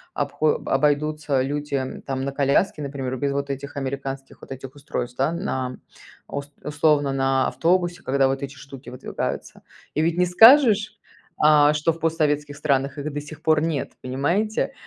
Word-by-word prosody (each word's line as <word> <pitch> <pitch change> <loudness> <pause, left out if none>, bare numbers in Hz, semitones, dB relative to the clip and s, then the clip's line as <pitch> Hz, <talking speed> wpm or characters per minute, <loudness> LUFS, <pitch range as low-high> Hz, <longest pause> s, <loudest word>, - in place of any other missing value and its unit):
обхо 145 +2 +1
обойдутся 150 0 +1
люди, 145 +1 -3
м, 130 -1 -3
там, 135 -1 -3
на 140 - -2
коляске, 140 +4 +1
например, 135 -2 -4
без, 140 +2 -1
вот, 140 0 -2
этих 140 +1 -7
американских, 135 0 -5
вот, - - -13
этих 135 0 -8
устройств, 125 -4 -5
да, 135 +4 +2
на 130 -7 -3 0.5
ус 145 0 -6
условно 145 -2 +2
на 135 -1 +1
автобусе, 175 0 0
когда 135 0 +2
вот 135 +1 -2
эти 140 0 -6
штуки 135 -1 -11
выдвигаются. 125 0 -5 0.3
И 155 - 0
ведь 165 +1 +1
не 180 - +4
скажешь, 220 +2 +6 0.4
а, 150 -1 +5
что 150 +2 +1
в 165 - -13
постсоветских 150 -3 0
странах 140 -1 0
их 145 +1 -4
до 145 - -3
сих 150 +1 -11
пор 155 -1 +3
нет, 160 -4 -2
понимаете? 170 - -1
145 Hz, 165 wpm, -23 LUFS, 135-155 Hz, 0.5 s, скажешь